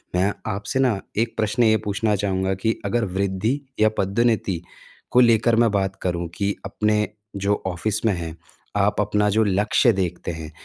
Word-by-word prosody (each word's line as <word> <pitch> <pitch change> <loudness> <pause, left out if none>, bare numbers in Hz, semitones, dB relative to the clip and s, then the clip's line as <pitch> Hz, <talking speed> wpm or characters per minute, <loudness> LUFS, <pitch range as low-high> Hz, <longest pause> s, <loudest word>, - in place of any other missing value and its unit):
मैं 95 +3 +2 0.2
आपसे 105 +7 -3
ना 125 -7 +2 0.2
1 115 +1 0
प्रश्न 110 +2 +1
ये 110 -1 +5
पूछना 105 +1 +1
चाहूँगा 95 -1 0
कि 110 0 +2
अगर 120 -2 +1
वृद्धि 100 +7 0 0.2
या 110 0 +5
पदोन्नति 100 -3 +1 0.5
को 125 - +5
लेकर 115 -1 +4
मैं 115 - +3
बात 95 -1 0
करूँ 85 -2 -2
कि 100 0 0
अपने 105 +1 +1 0.3
जो 100 +1 0
ऑफिस 105 +5 -2
में 110 - +3
हैं, 85 -2 -5 0.4
आप - - +2
अपना 105 0 +1
जो 110 +2 +3
लक्ष्य 105 +4 +3
देखते 90 -2 -2
हैं, 80 -2 -7
105 Hz, 170 wpm, -23 LUFS, 95-110 Hz, 0.5 s, ये